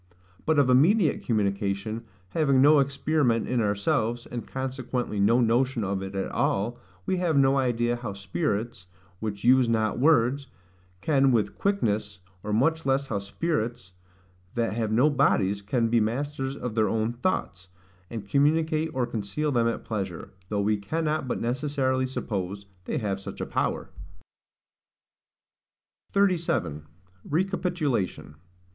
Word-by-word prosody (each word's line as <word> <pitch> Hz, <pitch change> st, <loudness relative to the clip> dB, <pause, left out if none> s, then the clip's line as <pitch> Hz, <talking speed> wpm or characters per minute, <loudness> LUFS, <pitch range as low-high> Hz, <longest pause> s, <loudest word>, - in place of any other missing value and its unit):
But 160 Hz, -1 st, +3 dB
of 140 Hz, -2 st, +5 dB
immediate 155 Hz, -, +4 dB
communication 105 Hz, +1 st, -1 dB, 0.2 s
having 140 Hz, -, +2 dB
no 145 Hz, +2 st, +7 dB
experiment 140 Hz, -3 st, +1 dB
in 125 Hz, -2 st, +1 dB
ourselves, 110 Hz, +3 st, 0 dB
and 120 Hz, -1 st, -6 dB
consequently 130 Hz, -4 st, -3 dB
no 115 Hz, +5 st, +4 dB
notion 120 Hz, +1 st, +2 dB
of 100 Hz, 0 st, -2 dB
it 95 Hz, 0 st, -6 dB
at 95 Hz, -, -2 dB
all, 110 Hz, +5 st, 0 dB, 0.3 s
we 185 Hz, -, 0 dB
have 170 Hz, -5 st, +1 dB
no 135 Hz, 0 st, +4 dB
idea 120 Hz, -2 st, +1 dB
how 115 Hz, -4 st, -5 dB
spirits, 100 Hz, +2 st, -3 dB, 0.3 s
which 105 Hz, -2 st, -4 dB
use 125 Hz, 0 st, +5 dB
not 110 Hz, -1 st, +1 dB
words, 140 Hz, -1 st, +3 dB, 0.5 s
can 135 Hz, -3 st, +3 dB
with 105 Hz, -4 st, +1 dB
quickness; 105 Hz, -, 0 dB, 0.2 s
or 105 Hz, -, -5 dB
much 160 Hz, +9 st, +2 dB
less 135 Hz, +1 st, +1 dB
how 105 Hz, -6 st, -2 dB
spirits 120 Hz, -, -3 dB, 0.6 s
that 115 Hz, -2 st, 0 dB
have 110 Hz, -1 st, -1 dB
no 125 Hz, +7 st, +4 dB
bodies 105 Hz, -9 st, +2 dB
can 115 Hz, +3 st, 0 dB
be 115 Hz, +1 st, +3 dB
masters 135 Hz, +4 st, -2 dB
of 125 Hz, -4 st, -5 dB
their 110 Hz, -1 st, +2 dB
own 110 Hz, +1 st, 0 dB
thoughts, 120 Hz, -, -2 dB, 0.4 s
and 110 Hz, -4 st, -6 dB
communicate 155 Hz, +4 st, +2 dB
or 130 Hz, -2 st, +1 dB
conceal 115 Hz, +6 st, -2 dB
them 120 Hz, -3 st, +2 dB
at 115 Hz, -, -3 dB
pleasure, 95 Hz, -6 st, -4 dB, 0.2 s
though 105 Hz, -1 st, 0 dB
we 105 Hz, +1 st, +1 dB
cannot 155 Hz, +7 st, -2 dB
but -, -, -2 dB
necessarily 130 Hz, +1 st, 0 dB
suppose 100 Hz, -5 st, -4 dB, 0.2 s
they -, -, -2 dB
have 100 Hz, -4 st, -2 dB
such 100 Hz, -, -8 dB
a -, -, -2 dB
power. -, -, -2 dB, 2.2 s
37. 165 Hz, -, 0 dB, 0.4 s
Recapitulation. 165 Hz, -, -1 dB
120 Hz, 140 wpm, -26 LUFS, 105-140 Hz, 2.2 s, no